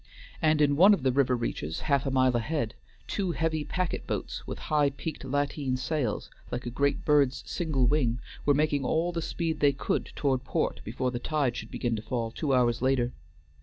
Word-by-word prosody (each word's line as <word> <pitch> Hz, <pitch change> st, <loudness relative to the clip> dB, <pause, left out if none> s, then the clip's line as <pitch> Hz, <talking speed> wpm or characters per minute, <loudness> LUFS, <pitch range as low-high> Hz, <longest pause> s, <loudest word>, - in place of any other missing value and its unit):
And 155 Hz, -1 st, +3 dB
in 145 Hz, -1 st, +3 dB
one 195 Hz, +7 st, +7 dB
of -, -, -9 dB
the 130 Hz, -, +3 dB
river 130 Hz, -1 st, +3 dB
reaches 80 Hz, -10 st, -3 dB
half 140 Hz, -3 st, +1 dB
a -, -, +2 dB
mile 130 Hz, -1 st, +3 dB
ahead, 120 Hz, -1 st, -1 dB, 0.3 s
two 190 Hz, -4 st, -1 dB
heavy 160 Hz, -1 st, 0 dB
packet 180 Hz, +2 st, -2 dB
boats, -, -, -4 dB
with -, -, -4 dB, 0.2 s
high 145 Hz, -2 st, +4 dB
peaked 140 Hz, +2 st, -6 dB
lateen 140 Hz, -1 st, -1 dB
sails, 130 Hz, -3 st, -2 dB, 0.2 s
like 125 Hz, -, -4 dB
a 120 Hz, -, -3 dB
great 140 Hz, +3 st, 0 dB
bird's 145 Hz, -3 st, +3 dB
single 155 Hz, -7 st, 0 dB
wing, 125 Hz, -4 st, +2 dB, 0.2 s
were 145 Hz, -, +4 dB
making 145 Hz, -1 st, +1 dB
all 165 Hz, +6 st, +1 dB
the 170 Hz, -1 st, -2 dB
speed 165 Hz, -1 st, -2 dB
they 145 Hz, -1 st, +4 dB
could 135 Hz, -, -2 dB
toward 135 Hz, -3 st, 0 dB
port -, -, -1 dB
before 125 Hz, +3 st, -2 dB
the 120 Hz, -, -3 dB
tide 140 Hz, -3 st, 0 dB
should -, -, -6 dB
begin 120 Hz, -2 st, -1 dB
to -, -, -5 dB
fall 115 Hz, -1 st, -2 dB
two 145 Hz, +4 st, -2 dB
hours 120 Hz, -3 st, +3 dB
later. 130 Hz, -2 st, +1 dB
140 Hz, 200 wpm, -28 LUFS, 125-155 Hz, 0.3 s, one